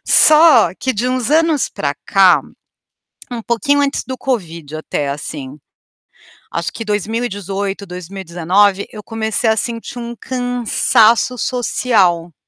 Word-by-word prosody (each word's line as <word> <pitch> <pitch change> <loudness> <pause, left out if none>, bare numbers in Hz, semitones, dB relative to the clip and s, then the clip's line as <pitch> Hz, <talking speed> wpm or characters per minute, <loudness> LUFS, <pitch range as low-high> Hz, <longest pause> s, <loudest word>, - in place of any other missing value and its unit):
Só, 310 +1 +6
que 260 - 0
de 225 +4 -1
uns 255 0 -1
anos 320 -2 +2
para 140 -1 -3
cá, 185 -6 +5 0.9
um 240 -2 -5
pouquinho 240 +6 +1
antes 280 0 -1
do 260 0 -5
Covid 170 - -4
até 145 -2 -3
assim, 140 -1 -6 1.0
Acho 170 0 -3
que 225 - -6
2018, 205 -2 -3
2019, 185 +2 0
eu 210 - -9
comecei 225 +1 -2
a 220 - +2
sentir 230 +2 -4
um 235 0 -6
cansaço 245 -1 +2
social. 195 -10 0
215 Hz, 120 wpm, -17 LUFS, 180-245 Hz, 1.0 s, Só